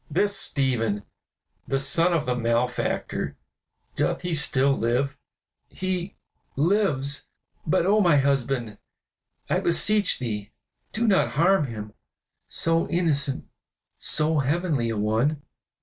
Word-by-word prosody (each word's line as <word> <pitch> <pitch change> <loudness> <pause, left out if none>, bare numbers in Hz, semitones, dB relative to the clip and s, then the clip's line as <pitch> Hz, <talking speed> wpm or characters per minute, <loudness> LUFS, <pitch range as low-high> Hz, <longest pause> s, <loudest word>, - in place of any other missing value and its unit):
"This 200 +6 +1
Stephen, 115 -7 -1 0.6
the 135 - 0
son 165 +6 +2
of 160 -3 +1
the 125 - 0
malefactor, 120 +1 -1 0.6
doth - - -1
he 175 -1 -2
still 140 -3 +2
live?" 130 +4 0 0.5
"He 185 0 -3 0.4
lives; 145 -4 +1 0.4
but, 170 +2 +2
oh 210 +3 +4
my 170 -6 +4
husband, 135 -5 0 0.7
I - - +1
beseech 200 +4 +3
thee 110 -4 -5 0.4
do 230 +2 -1
not 200 -4 +2
harm 170 0 +3
him, 105 -3 -7 0.5
so 165 0 +1
innocent, 150 -6 0 0.5
so 155 0 +2
heavenly 145 -3 0
a 110 - -2
one!" 115 +8 0
145 Hz, 115 wpm, -25 LUFS, 125-175 Hz, 0.7 s, oh